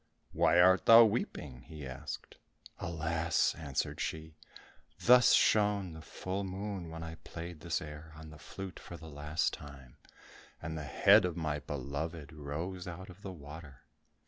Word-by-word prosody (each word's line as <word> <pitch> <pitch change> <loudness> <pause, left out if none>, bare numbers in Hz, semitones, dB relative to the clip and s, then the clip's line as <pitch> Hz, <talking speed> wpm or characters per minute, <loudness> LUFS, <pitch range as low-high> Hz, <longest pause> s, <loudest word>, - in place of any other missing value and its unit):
"Why 85 - +4
art 95 +1 +5
thou 115 0 +10
weeping?" 70 - -3
he 75 -3 -8
asked. 65 -1 -7 0.4
"Alas," 80 0 0
answered 70 -5 -3
she, 80 0 -4 0.7
"thus 125 0 +7
shone 105 -4 +3
the 80 - -9
full 95 +4 -4
moon 95 -2 -5
when 80 0 -7
I 80 0 -7
played 85 -1 -7
this 85 +1 -1
air 75 +1 -9
on 80 0 -11
the 75 - -12
flute 95 +3 -8
for 85 - -9
the 80 - -12
last 75 +2 -1
time, 70 -4 -11 0.6
and 80 0 -5
the 75 -2 -5
head 70 - +6
of 90 -1 -2
my 75 -3 -1
beloved 75 +3 -5
rose 80 +5 -5
out 90 +2 -7
of 90 +3 -16
the 100 - -6
water." 75 -4 -11
80 Hz, 155 wpm, -33 LUFS, 75-90 Hz, 0.7 s, thou